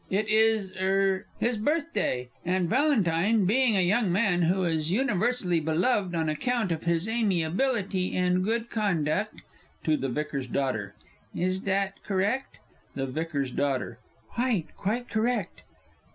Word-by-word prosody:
It 210 +3 0
is 220 -3 +3
er 190 +1 +1
his 240 -1 +1
birthday, 290 - -1
and 180 0 0
Valentine, 215 - +2
being 230 +2 +3
a - - +4
young 195 +2 +2
man 185 -2 +2
who 185 +3 +2
is 160 -2 0
universally 210 -5 +1
beloved 175 +4 +1
on 160 -1 0
account 220 +6 0
of 165 0 -3
his 170 +3 +1
amiability 195 -1 0
and 180 0 +2
good 230 +3 -1
conduct 205 -2 -1 0.4
(To 155 - +2
the 135 - -2
VICAR'S 140 -1 -3
D. 125 - -1 0.8
"Is 185 +2 0
that 195 0 -1
correct?" 205 +7 -1 0.4
THE 135 - -1
V.'S 140 -1 -3
D. - - -2 0.7
"Quite, 235 -9 -1
quite 235 +5 -2
correct!") 220 -4 -1
190 Hz, 135 wpm, -27 LUFS, 170-225 Hz, 0.8 s, a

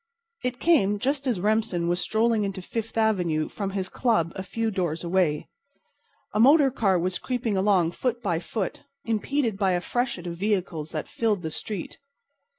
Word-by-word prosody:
It 250 -1 -2
came 210 - +3
just 275 +5 -1
as 235 -7 +1
Remsen 210 -4 +1
was 175 +1 +1
strolling 220 0 +2
into 195 -1 -3
Fifth 225 +5 -5
avenue 180 -8 +2
from 200 -2 -3
his 190 -1 -2
club 200 -10 +1
a - - -4
few 225 +4 -2
doors 175 -4 -2
away. 170 -4 +1 0.9
A 210 - 0
motor 275 +3 +6
car 200 -7 +2
was 180 +1 -1
creeping 245 -4 -1
along 190 -4 +3
foot 245 +4 -2
by 175 -8 0
foot, 190 +2 -4 0.2
impeded 225 0 0
by 190 -3 +3
a 175 - +2
freshet 240 -2 -2
of 170 -1 -5
vehicles 180 -6 -1
that - - -4
filled 210 -5 0
the 160 - -3
street. 200 +2 -5
200 Hz, 170 wpm, -26 LUFS, 180-230 Hz, 0.9 s, motor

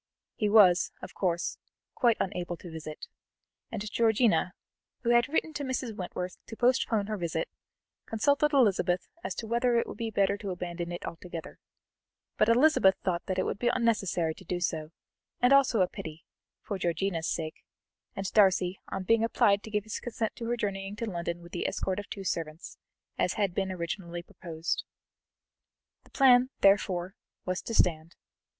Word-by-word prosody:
He 210 - 0
was, 195 -4 +6
of - - -8
course, 175 -2 -1 0.3
quite 235 -2 +3
unable 180 -2 -2
to 175 - -10
visit, 155 -1 -7 0.7
and 215 -2 -4
Georgiana, 220 -5 +3 0.5
who 235 - +2
had 240 +1 +4
written 315 +1 0
to 295 - -4
Mrs. 255 -4 -3
Wentworth 180 -1 -5
to 225 - -8
postpone 240 -4 +2
her 215 0 -3
visit, 175 - -2 0.6
consulted 285 +6 +2
Elizabeth 195 - +2 0.2
as - - -3
to 230 - -5
whether 235 +2 +1
it 235 - +2
would - - -9
be 230 -1 -2
better 200 -1 +2
to 200 -1 -6
abandon 175 -1 -4
it 175 - -5
altogether, 170 -1 -7 0.8
but 215 - +3
Elizabeth 230 -6 +5
thought 175 -2 0
that 185 - -1
it - - +2
would - - -3
be 240 - +2
unnecessary 195 -9 +1
to 190 - -15
do 180 0 -3
so, 160 -3 -2 0.5
and 250 +2 +5
also 260 -6 +5
a 180 - +4
pity, 160 -1 -8 0.4
for 200 -2 -4
Georgiana's 170 -1 -1
sake, 155 -2 -4 0.5
and 195 - -4
Darcy, 190 -3 +4
on 190 - -3
being 225 +4 +3
applied 205 -3 +3
to 220 - -9
give 210 -1 -1
his 215 - -5
consent 230 -2 -3
to 235 - -6
her 240 +1 -1
journeying 195 -2 -3
to 230 - -3
London 170 -2 -4
with 170 - -13
the 175 - -2
escort 190 +1 -2
of 205 - -8
two 195 - -6
servants, 160 -3 -4 0.4
as - - +2
had 200 -5 0
been 190 0 -1
originally 170 -1 -4
proposed. 165 -1 -4 1.2
The - - -20
plan, 255 -2 +5
therefore, 190 -2 +3 0.3
was 185 0 -1
to 230 - -4
stand. 165 -2 +1
195 Hz, 170 wpm, -29 LUFS, 175-230 Hz, 1.2 s, was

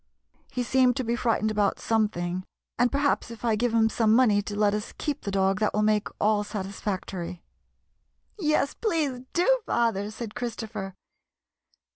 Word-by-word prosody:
He 250 - -1
seemed 255 0 +3
to 260 - -1
be 235 0 0
frightened 225 -3 +1
about 205 -2 +1
something, 185 -5 0 0.4
and 245 0 +3
perhaps 280 -3 +1
if 230 0 -8
I 225 -2 +3
give 240 +2 +1
him 225 -1 +4
some 225 -1 +3
money 220 -5 +4
to 205 0 -6
let 205 -1 +3
us 210 0 -4
keep 295 -2 -3
the - - -4
dog 195 0 +1
that 215 - +1
will 210 - +2
make 210 -1 +2
all 210 0 +2
satisfactory." 190 -3 -5 1.0
"Yes, 305 -4 +1
please, 310 - -1
do, - - +3
father/' 215 -4 +1
said 220 0 -7
Christopher. 220 -5 -5
220 Hz, 160 wpm, -27 LUFS, 205-245 Hz, 1.0 s, him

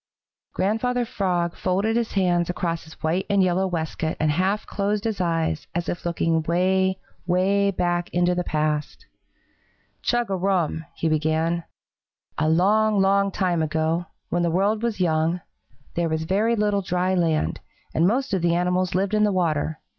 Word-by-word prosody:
Grandfather 240 +5 0
Frog 180 -7 -1
folded 195 +5 0
his 235 -1 -1
hands 175 -3 +1
across 170 -2 -2
his 160 - -15
white 170 +4 0
and 200 -1 +4
yellow 185 +1 +1
waistcoat 160 -2 -3
and 155 -1 +2
half 190 +6 0
closed 205 +1 -1
his 220 -4 -2
eyes, 165 -2 -1
as 175 0 -1
if 175 0 -3
looking 165 -1 +1
way, 190 +3 +1 0.3
way 195 +3 +2
back 175 -2 -1
into 175 0 +2
the 180 0 -1
past. 150 -2 -2 1.0
"Chug 240 -4 0
a - - +1
rum!" 180 -4 0
he 165 - -1
began. 160 +2 0 0.7
"A 155 0 +2
long, 205 +5 +3
long 200 +1 +3
time 180 -3 0
ago, 160 +2 0 0.2
when 175 - 0
the 170 - +2
world 200 +5 +1
was 235 -3 -2
young, 165 0 +1 0.5
there 170 -1 0
was 160 0 -1
very 210 +7 +1
little 205 -2 +1
dry 180 0 0
land, 165 -4 +1 0.3
and 165 +3 +3
most 255 +3 0
of 190 - +1
the 170 0 +2
animals 180 +1 0
lived 195 +2 0
in 210 0 +3
the 210 - +3
water. 160 -4 0
180 Hz, 165 wpm, -24 LUFS, 165-200 Hz, 1.0 s, and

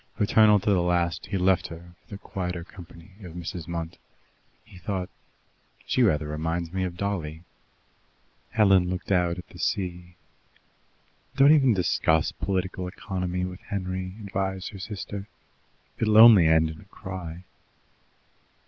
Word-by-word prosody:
Fraternal 105 0 +5
to 105 - 0
the 95 -3 +3
last, 85 -1 0
he 100 - -2
left 95 0 +2
her 85 +1 -11
for - - -34
the 100 - -7
quieter 90 -3 -5
company 85 0 -14
of 90 -4 -9
Mrs. 85 -1 -6
Munt. 85 -1 -5 0.7
He 100 -5 -15
thought, 95 -1 -3 0.8
"She - - +1
rather 75 0 +3
reminds 80 +3 -3
me 95 0 -1
of 90 -1 -6
Dolly." 85 -5 -3 1.1
Helen 95 -5 +4
looked 90 +2 -4
out 90 -2 +2
at 90 - -9
the 90 - -14
sea. 90 -2 -3 1.2
"Don't 140 +1 +6
even 135 -7 +5
discuss 80 -3 +1
political 95 -1 -3
economy 90 -1 -3
with 90 0 -7
Henry," 95 -1 -4
advised 95 -1 -3
her 100 - -10
sister. 100 0 -6 0.7
"It'll 110 -1 +3
only 110 -7 +9
end 80 0 +3
in 80 - -11
a - - -17
cry." 90 -2 -8
90 Hz, 140 wpm, -26 LUFS, 85-100 Hz, 1.2 s, only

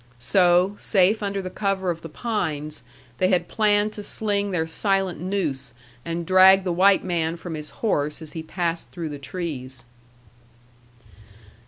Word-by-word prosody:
So, 180 +7 +3
safe 200 +2 +3
under 200 -1 -2
the 185 - -6
cover 195 -3 -1
of 165 - -6
the 165 - -8
pines, 155 -7 -3 0.4
they 185 - +3
had 180 -2 +1
planned 210 0 +2
to 210 - -5
sling 205 -1 -1
their 170 -4 0
silent 190 +1 0
noose, 140 -10 -2 0.3
and 170 0 -4
drag 190 +1 +7
the 180 -2 -1
white 190 +3 +4
man 170 -2 -1
from 170 0 -7
his 150 -1 -6 0.2
horse 150 -8 0
as 160 -2 -8
he 160 - -5
passed 170 +1 -3
through 170 -3 -5
the 145 -1 -7
trees. 135 -6 -6
180 Hz, 155 wpm, -24 LUFS, 160-195 Hz, 0.4 s, drag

